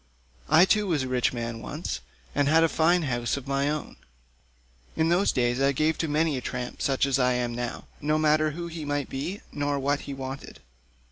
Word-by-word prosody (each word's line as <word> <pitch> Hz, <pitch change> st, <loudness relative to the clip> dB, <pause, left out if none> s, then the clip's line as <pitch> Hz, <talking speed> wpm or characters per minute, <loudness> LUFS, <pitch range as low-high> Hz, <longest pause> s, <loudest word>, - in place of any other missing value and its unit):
I 160 Hz, +4 st, +7 dB
too 210 Hz, +1 st, +2 dB
was 155 Hz, -7 st, +1 dB
a -, -, -3 dB
rich 125 Hz, -1 st, +1 dB
man 115 Hz, -2 st, -4 dB
once, 60 Hz, -, -4 dB, 0.3 s
and 145 Hz, -1 st, +2 dB
had 160 Hz, +2 st, +5 dB
a -, -, +5 dB
fine 170 Hz, +3 st, +3 dB
house 120 Hz, -2 st, -1 dB
of 135 Hz, -1 st, -8 dB
my 140 Hz, +1 st, +1 dB
own; 150 Hz, 0 st, -4 dB, 1.0 s
in 160 Hz, +1 st, +2 dB
those 180 Hz, +4 st, +3 dB
days 120 Hz, 0 st, +1 dB
I 140 Hz, 0 st, +3 dB
gave 155 Hz, +4 st, +2 dB
to 165 Hz, -, 0 dB
many 155 Hz, -1 st, +1 dB
a -, -, -4 dB
tramp 125 Hz, 0 st, -5 dB
such 135 Hz, -1 st, +2 dB
as 135 Hz, -1 st, +1 dB
I 125 Hz, -1 st, +3 dB
now 120 Hz, 0 st, -4 dB, 0.2 s
am, 145 Hz, -, -6 dB
no 155 Hz, 0 st, +3 dB
matter 155 Hz, 0 st, +3 dB
who 170 Hz, +3 st, -5 dB
he 165 Hz, -2 st, -6 dB
might 145 Hz, -1 st, -2 dB
be 160 Hz, +10 st, -4 dB
nor 145 Hz, 0 st, -1 dB
what 140 Hz, +1 st, 0 dB
he 140 Hz, -, -4 dB
wanted. 135 Hz, 0 st, -7 dB
145 Hz, 210 wpm, -27 LUFS, 130-155 Hz, 1.0 s, I